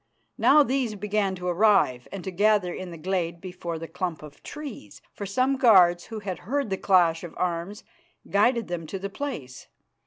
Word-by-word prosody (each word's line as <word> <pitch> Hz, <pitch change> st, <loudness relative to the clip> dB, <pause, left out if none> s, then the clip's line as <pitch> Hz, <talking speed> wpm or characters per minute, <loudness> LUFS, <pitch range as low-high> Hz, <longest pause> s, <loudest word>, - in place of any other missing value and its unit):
Now 295 Hz, +1 st, +6 dB
these 255 Hz, -4 st, -1 dB
began 205 Hz, -1 st, -1 dB
to 180 Hz, 0 st, -6 dB
arrive 175 Hz, -, +3 dB
and 195 Hz, -2 st, -6 dB
to 190 Hz, -, -4 dB
gather 200 Hz, -1 st, +2 dB
in 185 Hz, -1 st, -6 dB
the 170 Hz, -, -9 dB
glade 170 Hz, 0 st, -2 dB
before 175 Hz, -2 st, -6 dB
the 165 Hz, +1 st, -7 dB
clump 175 Hz, -4 st, -4 dB
of 150 Hz, -2 st, -13 dB
trees, 275 Hz, -, -9 dB
for 200 Hz, -, -6 dB
some 255 Hz, +7 st, +1 dB
guards 180 Hz, -8 st, +5 dB
who 220 Hz, -1 st, -7 dB
had 190 Hz, -4 st, -5 dB
heard 265 Hz, +3 st, -2 dB
the 190 Hz, -, 0 dB
clash 175 Hz, -4 st, +3 dB
of 175 Hz, -, -9 dB
arms 180 Hz, +4 st, -3 dB, 0.4 s
guided 230 Hz, +3 st, +2 dB
them 170 Hz, -2 st, -5 dB
to 195 Hz, -, -4 dB
the 195 Hz, +1 st, -6 dB
place. 145 Hz, -, -6 dB
190 Hz, 185 wpm, -26 LUFS, 175-215 Hz, 0.4 s, Now